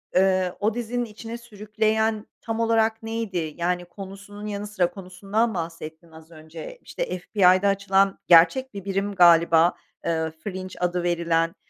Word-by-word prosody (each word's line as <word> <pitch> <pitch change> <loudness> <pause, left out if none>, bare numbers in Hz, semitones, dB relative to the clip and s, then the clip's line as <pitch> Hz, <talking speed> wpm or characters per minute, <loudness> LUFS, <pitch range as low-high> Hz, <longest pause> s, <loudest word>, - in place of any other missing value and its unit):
eee, 185 -1 +3
o 215 +1 +1
dizinin 240 +1 -2
içine 225 +2 -8
sürükleyen 220 -1 -1
tam 225 0 -4
olarak 225 -1 +1
neydi? 195 -9 -3
Yani, 175 +1 -1
konusunun 200 +3 -10
yanı 205 0 -4
sıra, 180 -4 0
konusundan 200 +4 -2
bahsettin 165 -1 -7
az 160 +1 -15
önce. 160 - -10
İşte, - - -4
FBI'da 185 +1 +3
açılan 195 0 +2
gerçek 180 +10 +5
bir 200 -1 -8
birim 195 +1 -2
galiba, 170 -1 +6 0.3
eee, 160 -1 -1
Fringe 185 -2 -6
adı 180 0 -1
verilen, 170 0 0
195 Hz, 140 wpm, -24 LUFS, 175-215 Hz, 0.3 s, galiba